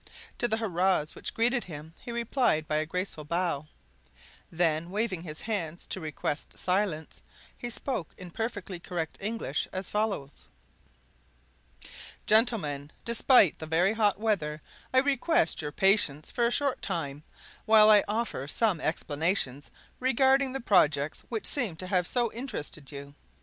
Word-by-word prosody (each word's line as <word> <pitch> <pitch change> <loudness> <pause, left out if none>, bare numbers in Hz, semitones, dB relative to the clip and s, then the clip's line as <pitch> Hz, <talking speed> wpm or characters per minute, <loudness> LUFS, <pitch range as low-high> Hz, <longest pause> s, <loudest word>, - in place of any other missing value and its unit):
To 240 - +2
the 220 -1 0
hurrahs 185 -6 +1
which - - -5
greeted 240 +2 +2
him 160 -1 -9
he 240 - -8
replied 235 - +1
by 155 - 0
a 155 0 -1
graceful 180 -2 -3
bow; 165 -2 -1 0.8
then, 165 -1 0
waving 200 -3 -1
his 155 -2 -7
hands 175 -7 -3
to 190 - -5
request 150 -1 -4
silence, 180 -4 -1 0.3
he 240 - -5
spoke 235 - -4
in 180 -2 -10
perfectly 205 -4 -4
correct 170 -3 -4
English 205 -8 -2
as 185 0 -4
follows: 205 -10 -2 1.8
"Gentlemen, 195 - +2
despite 235 - +4
the 160 - -6
very 175 +6 +2
hot 210 -3 +2
weather 175 -9 -1 0.3
I 260 - +1
request 275 - +2
your 150 -1 -4
patience 190 -6 +3
for 235 -1 +2
a - - -1
short 275 +1 +1
time 150 -7 -3 0.4
while 215 -1 +7
I 210 -1 +7
offer 210 - -2
some 190 +1 +1
explanations 155 -3 -1 0.3
regarding 265 +1 +3
the 270 - -3
projects 150 - +2
which 225 -3 -3
seem 235 - +3
to 185 - -7
have 180 -1 +1
so 240 -3 +1
interested 155 - -4
you. 140 0 -9
185 Hz, 145 wpm, -28 LUFS, 155-225 Hz, 1.8 s, while